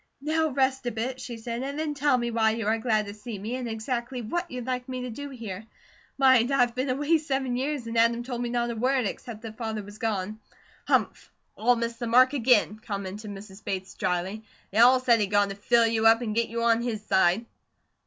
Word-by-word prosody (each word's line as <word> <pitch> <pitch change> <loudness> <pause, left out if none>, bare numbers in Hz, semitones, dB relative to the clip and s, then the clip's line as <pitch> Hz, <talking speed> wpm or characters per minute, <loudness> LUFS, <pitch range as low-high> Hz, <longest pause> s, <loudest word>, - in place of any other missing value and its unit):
"Now 315 +3 +1
rest 265 -2 0
a - - 0
bit," 250 +4 -4
she 245 -2 -6
said, 235 +1 -5
"and 280 +2 -4
then 310 -1 -2
tell 285 -2 +2
me 240 -1 -2
why 220 -1 +2
you 225 -2 -3
are 220 +2 +1
glad 220 -2 +1
to 200 - -7
see 210 +1 -7
me, 215 +5 -4
and 250 -2 -4
exactly 235 +3 -3
what 345 +10 -3
you'd 250 -4 -6
like 255 0 -3
me 255 -1 -4
to 250 -1 -5
do 285 +5 -7
here. 220 -5 -7 0.5
Mind, 260 -3 +5
I've 245 -3 +3
been 255 +2 -2
away 295 +5 +2
seven 270 -4 -1
years, 270 0 -2
and 230 0 -5
Adam 230 +1 +3
told 245 -1 -4
me 240 - -2
not 240 0 0
a - - -5
word, 255 +2 +1
except 220 +2 -6
that 220 -1 -8
Father 220 -2 -3
was 205 +1 -12
gone." 215 -1 -2 0.5
"Humph! - - 0 0.2
All 245 +3 +3
missed 235 0 -3
the 240 - -3
mark 255 +3 +5
again," 230 -5 +3
commented 205 -1 -6
Mrs. 200 0 -10
Bates 190 -1 -4
dryly. 185 +4 -2 0.3
"They 210 - 0
all 250 +2 +7
said 240 -2 +4
he'd 205 - +1
gone 205 0 +2
to 195 - -5
fill 230 +3 +3
you 225 0 +3
up, 225 +2 +5
and 215 -3 -2
get 230 +1 0
you 230 +1 -2
on 230 0 +3
his 220 -3 -3
side." 190 +4 +3
235 Hz, 230 wpm, -27 LUFS, 215-255 Hz, 0.5 s, all